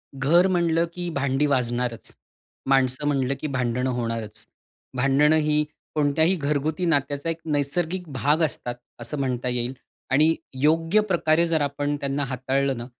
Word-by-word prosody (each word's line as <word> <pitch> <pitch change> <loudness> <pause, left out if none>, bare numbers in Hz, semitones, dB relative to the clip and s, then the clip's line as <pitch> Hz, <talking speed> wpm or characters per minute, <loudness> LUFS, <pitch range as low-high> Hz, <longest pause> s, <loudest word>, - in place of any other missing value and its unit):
घरं 165 +7 +4
म्हणलं 170 -2 +2
की 175 0 -4
भांडी 140 +1 +1
वाजणारचं, 125 -4 -1 0.6
माणसं 130 +1 +2
म्हणलं 135 -2 +1
की - - -3
भांडणं 125 -1 -1
होणारचं. 115 -3 -4 0.5
भांडणं 140 +4 +4
ही 150 -1 +2 0.3
कोणत्याही 155 +4 +2
घरगुती 150 +2 -1
नात्याचा 145 -1 0
एक 165 0 -3
नैसर्गिक 160 +4 -1
भाग 145 +6 +1
असतात 125 -5 -2 0.2
असं 125 +5 -4
म्हणता 125 -2 -1
येईल. 125 +1 -1 0.4
आणि 155 +4 +4 0.3
योग्य 165 +7 +3
प्रकारे 170 -5 +2
जर 160 -2 +1
आपण 145 +1 -1
त्यांना 140 +1 -1
हाताळलं 135 +1 -1
ना 120 - -6
145 Hz, 140 wpm, -24 LUFS, 130-160 Hz, 0.6 s, घरं